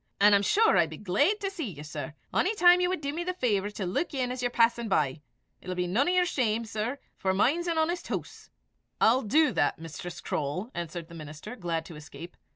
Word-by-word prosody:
An' 205 +1 +6
I'm 200 - +5
sure 435 - +4
I'll 170 - +4
be 155 0 -9
glaid 280 - +1
to 390 -1 -2
see 325 - -4
ye, 145 0 -9
sir, 155 0 -6 0.2
ony 405 +4 +2
time 355 -2 +6
ye 360 - +3
wad 365 -3 -2
dee 280 -1 -2
me 335 +4 -3
the 365 +1 -3
fawvour 205 - 0
to 195 - -3
luik 240 - -2
in 250 -2 -1
as 250 0 -4
ye're 245 - +1
passin' 235 -1 +2
by. 150 -5 +1 0.4
It'll 185 - -5
be 180 0 0
none 215 +11 +1
to - - +3
yer 365 0 +3
shame, 230 -8 0
sir, 220 +5 -3 0.2
for 190 -1 0
mine's 310 - +2
an 335 -1 0
honest 340 +2 0
hoose." - - -6 0.5
"I'll 245 +4 +5
do 300 +8 +3
that, 145 - +1
Mistress 165 +2 -8
Croale," 155 - -3
answered 170 -1 -5
the 170 - -14
minister, 155 +7 -8
glad 170 -6 -3
to 165 - -10
escape. 160 +3 -10
220 Hz, 230 wpm, -28 LUFS, -, 0.5 s, An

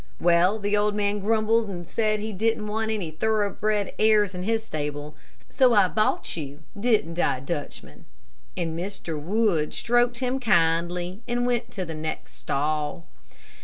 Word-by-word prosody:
Well, 175 +4 +4
the 205 0 0
old 210 0 +1
man 205 0 0
grumbled 220 +1 +2
and 175 -3 -6
said 215 +1 0
he 215 +1 -4
didn't 220 +2 0
want 220 +1 -2
any 200 -7 -2
thoroughbred 210 +2 0
airs 215 -3 +4
in 180 - -5
his 220 +3 0
stable, 150 -3 -4 0.3
so 250 -3 +4
I 195 -3 +5
bought 215 +2 0
you, 145 -1 -7
didn't 205 -6 +1
I, 130 - +2
Dutchman?" 145 +2 -6 0.5
and 165 -2 -2
Mr. 170 -3 -5
Wood 180 -3 +1
stroked 240 0 +2
him 255 +1 -1
kindly 175 -2 +1
and 245 0 0
went 245 -1 0
to 190 -3 -3
the 165 - -6
next 155 0 -5
stall. 150 +3 -2
200 Hz, 155 wpm, -25 LUFS, 165-220 Hz, 0.5 s, I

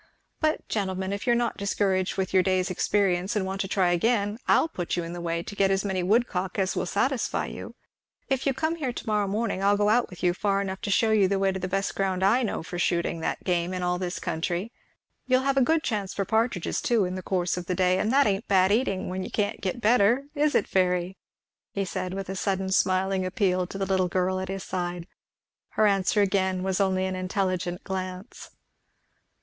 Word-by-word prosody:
But 310 -1 0
gentlemen, 190 -2 -2
if 200 +5 -5
you 240 - +5
are - - +3
not 235 0 0
discouraged 195 -2 0
with 190 -1 -2
your 190 - +6
day's 185 0 +1
experience 190 0 +1
and 200 -3 0
want 190 +1 -3
to 195 - -2
try 185 -2 +2
again, 205 +3 +1
I'll - - +4
put 180 - -3
you 175 - -1
in 170 +1 -6
a 175 - -6
way 170 0 -2
to 205 - -8
get 195 -1 +3
as 195 +1 +1
many 190 -2 -1
woodcock 190 -2 0
as 190 -1 0
will - - -1
satisfy 265 +6 0
you - - -8 0.5
if 270 -1 -1
you'll 270 - +1
come 315 +4 -1
here 270 -6 -2
to 240 - -7
morrow 210 -2 +1
morning 200 -1 -1
I'll 200 +1 +4
go 205 0 +2
out 240 +3 +3
with 180 - -11
you 175 -1 +3
far 195 +1 0
enough 190 -1 -4
to 225 - -3
shew 220 +2 +3
you 205 -3 +4
the 195 +1 0
way 195 0 +2
to 190 - -4
the 185 - -3
best 195 +1 -1
ground 190 -1 -1
I 215 +7 +4
know 220 -8 -2
for 175 +2 -6
shooting 170 -1 0
that 160 - -3
game 175 0 0
in 180 - -3
all 180 0 0
this 180 -1 -3
country; 175 +5 -3 0.6
you'll 255 0 +3
have 275 0 +1
a 270 - +4
good 320 +5 +2
chance 205 -5 -2
for 195 - -1
partridges 220 -5 0
too 230 -5 +2
in 180 - -3
the 185 - -4
course 180 -1 -1
of 180 -1 -6
the 180 - -1
day; 185 0 +2
and 220 - 0
that 280 +2 +5
ain't 200 +2 0
bad 190 -1 +4
eating, 205 -4 0
when 185 +1 -3
you - - -6
can't 205 -1 -2
get 195 +5 -3
better 235 +3 +4
is 295 +1 +1
it, - - +2
Fairy?" 180 0 +1 0.6
he 195 -1 -1
said, 185 -1 -4
with 195 -1 -4
a 190 - -4
sudden 190 0 -1
smiling 190 0 +2
appeal 185 -1 0
to 195 - -7
the 195 - -1
little 190 -1 +1
girl 185 +1 0
at 190 0 -5
his 195 -1 -4
side. 175 -2 -4 0.7
Her 215 - +5
answer 200 +1 +3
again 190 -2 0
was 190 +1 0
only 190 -1 +1
an 190 0 -2
intelligent 185 -1 -2
glance. 185 +2 -6
190 Hz, 230 wpm, -26 LUFS, 185-205 Hz, 0.7 s, your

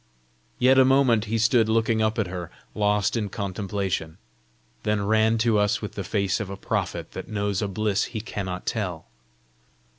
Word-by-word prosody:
Yet 130 +1 +5
a - - +8
moment 130 -4 +4
he 115 +1 -1
stood 115 0 +3
looking 110 0 +2
up 110 +1 +1
at 110 - +1
her, 90 -2 -6 0.2
lost 105 0 +1
in 105 -3 -1
contemplation 95 -4 -3 0.6
then 105 -1 0
ran 110 +1 +3
to 110 -3 +3
us 105 0 +2
with 105 - -6
the 100 - -4
face 100 +1 0
of 105 -3 -4
a 100 - -6
prophet - - -3
that - - -7
knows 100 -2 -1
a 105 - 0
bliss 105 +1 0
he 115 - -5
cannot 95 -5 -5
tell. 95 -8 -3
105 Hz, 175 wpm, -25 LUFS, 100-110 Hz, 0.6 s, a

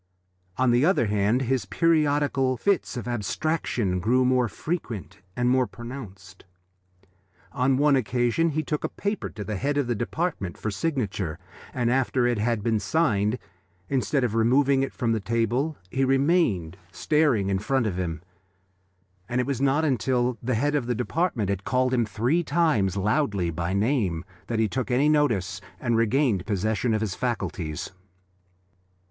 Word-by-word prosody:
On 130 -1 +3
the 120 +2 +3
other 165 -7 +3
hand, 105 +5 +1
his 125 -5 -1
periodical 145 - +2
fits 200 -7 0
of 120 - -5
abstraction 120 - -1
grew 125 +7 +2
more 125 -1 +3
frequent 115 - -5 0.2
and 125 0 0
more 130 0 +3
pronounced. 100 -7 -10 1.1
On 130 0 +1
one 145 0 +4
occasion 125 +6 +1
he 155 0 -1
took 150 -1 -3
a - - -1
paper 205 0 -3
to 105 - -7
the 105 0 -4
head 145 +6 -1
of 145 - +2
the 120 - 0
department 120 - -3
for 110 - -3
signature, 100 - -2 0.3
and 120 -2 0
after 130 -1 +1
it 120 -3 +1
had 110 -1 0
been 110 -1 +1
signed, 110 -5 +1 0.5
instead 135 +1 +1
of 120 -4 0
removing 135 +4 +3
it 135 - -1
from 120 -4 -1
the 110 - +1
table, 115 +8 -1
he 135 - +1
remained 135 - +2
staring 130 - +1
in 95 - +1
front 130 +4 0
of 95 -4 -2
him, 85 -2 -3 1.1
and 125 - 0
it 125 - +1
was 135 -2 -2
not 140 +3 +2
until 125 -2 +1
the 125 0 -1
head 145 +6 +1
of 140 -5 0
the 125 - 0
department 125 - -1
had 100 0 -2
called 130 +2 +1
him 120 -3 +2
three 120 - +1
times 135 - +1
loudly 100 - 0
by 85 +2 -3
name 100 - 0 0.2
that 115 - -2
he 110 0 +2
took 130 +5 -3
any 135 +4 +3
notice 115 - +1 0.2
and 120 -2 0
regained 115 -3 +2
possession 110 +3 0
of 110 - -1
his 105 -4 -1
faculties. 95 -10 -3
120 Hz, 165 wpm, -25 LUFS, 105-140 Hz, 1.1 s, one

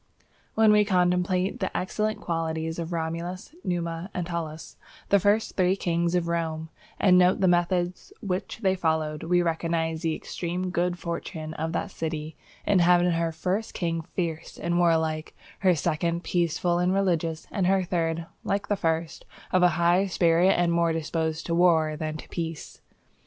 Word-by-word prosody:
_ - - -33 0.3
When 220 -1 +5
we 210 0 +6
contemplate 180 -1 +1
the 190 - -2
excellent 215 +3 -1
qualities 160 -1 -2
of 165 +1 -4
Romulus, 170 - -4
Numa, 170 0 -3
and 180 - -1
Tullus, 165 -2 -5 0.3
the 200 - +5
first 205 +3 +1
three 185 0 +3
kings 170 -2 0
of 175 -1 +1
Rome, 160 -1 -2 0.3
and 180 -2 +6
note 180 +1 +4
the 190 - +3
methods 175 0 0
which 190 +3 -4
they 190 -1 +4
followed, 160 -4 -1
we 175 +1 +2
recognize 165 -1 -1
the 165 -2 0
extreme 180 +1 -4
good 175 0 0
fortune 160 -2 -5
of 160 +1 -3
that 195 - -2
city 155 -2 -4 0.3
in 200 -2 +3
having 175 0 +4
her 165 0 0
first 185 +7 -2
king 165 -2 -1
fierce 165 -1 -4
and 175 0 0
warlike, 160 -2 +1 0.2
her 185 -2 +4
second 170 +3 -1
peaceful 175 0 0
and 180 +2 +2
religious, 165 -4 0
and 190 -4 0
her 190 0 +3
third, 165 -2 -1 0.2
like 200 0 -2
the 205 - +2
first, 165 -3 -2 0.3
of 185 - +3
a 180 - +7
high 175 +3 +3
spirit 175 0 +3
and 175 -1 +2
more 170 0 +2
disposed 160 0 -2
to 170 - -2
war 165 -3 +3
than 155 0 -4
to - - -11
peace. 165 -2 -5
170 Hz, 170 wpm, -26 LUFS, 165-180 Hz, 0.3 s, a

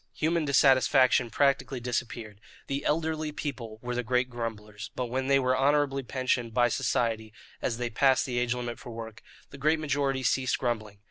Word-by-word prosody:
Human 165 0 0
dissatisfaction 130 -2 +4
practically 135 +1 +1
disappeared. 115 -3 -4 0.2
The 140 +1 -3
elderly 155 0 0
people 125 -7 -5
were 125 0 -3
the 125 - 0
great 125 +1 0
grumblers; 105 -3 -6
but 125 -2 -3
when 130 +1 -1
they 135 0 +5
were 130 -1 +2
honourably 140 0 +2
pensioned 125 -2 -1
by 120 -1 +4
society, 115 -3 -1 0.3
as 115 - -1
they 120 -1 -3
passed 130 +3 +3
the 125 -2 -1
age 120 0 0
limit 120 -1 -5
for - - -10
work, 115 0 -8 0.3
the 140 - -11
great 155 +3 +2
majority 140 -3 0
ceased 130 +1 +1
grumbling. 110 -5 -3
125 Hz, 175 wpm, -28 LUFS, 120-135 Hz, 0.3 s, they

